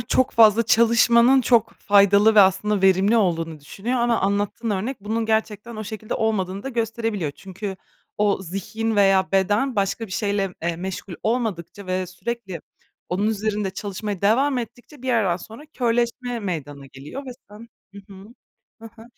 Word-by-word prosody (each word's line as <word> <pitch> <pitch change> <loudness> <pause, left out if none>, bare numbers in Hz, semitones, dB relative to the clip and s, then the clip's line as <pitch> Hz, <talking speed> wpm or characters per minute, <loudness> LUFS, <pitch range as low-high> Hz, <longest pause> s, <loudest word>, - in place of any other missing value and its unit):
çok 250 +2 +1
fazla 225 0 +5
çalışmanın 235 +3 +4
çok 235 -3 +2
faydalı 200 +1 +4
ve 210 - +8
aslında 195 +1 +2
verimli 195 +3 +4
olduğunu 165 -6 0
düşünüyor. 205 - -4
Ama 235 -1 +1
anlattığın 205 +3 -1
örnek 215 +7 -2
bunun 220 +3 -2
gerçekten 220 +1 -2
o 215 - -5
şekilde 215 +1 -5
olmadığını 200 -3 -1
da 270 - -5
gösterebiliyor. 225 - -2
Çünkü 195 +4 -7 0.4
o 205 -2 +1
zihin 215 +5 -3
veya 195 -1 +3
beden 205 +7 +1
başka 200 +3 -1
bir 185 - -11
şeyle, 200 -2 -1
eee, 170 0 -1
meşgul 185 0 -6
olmadıkça 205 -5 -3
ve 185 0 -2
sürekli 190 -1 -6 0.5
onun 190 +4 -1
üzerinde 210 -2 -1
çalışmaya 200 0 -5
devam 255 +6 +2
ettikçe 245 +4 -9
bir 260 - -5
yerden 205 -8 +2
sonra 225 +9 -12
körleşme 240 -3 -1
meydana 145 -7 -5
geliyor 135 - -9
ve 255 - -6 0.2
sen 215 +3 -13 0.3
hı 200 - -9
hı, 195 - -12 0.7
hı 225 - -10
hı. 225 - -13
210 Hz, 155 wpm, -22 LUFS, 190-230 Hz, 0.7 s, ve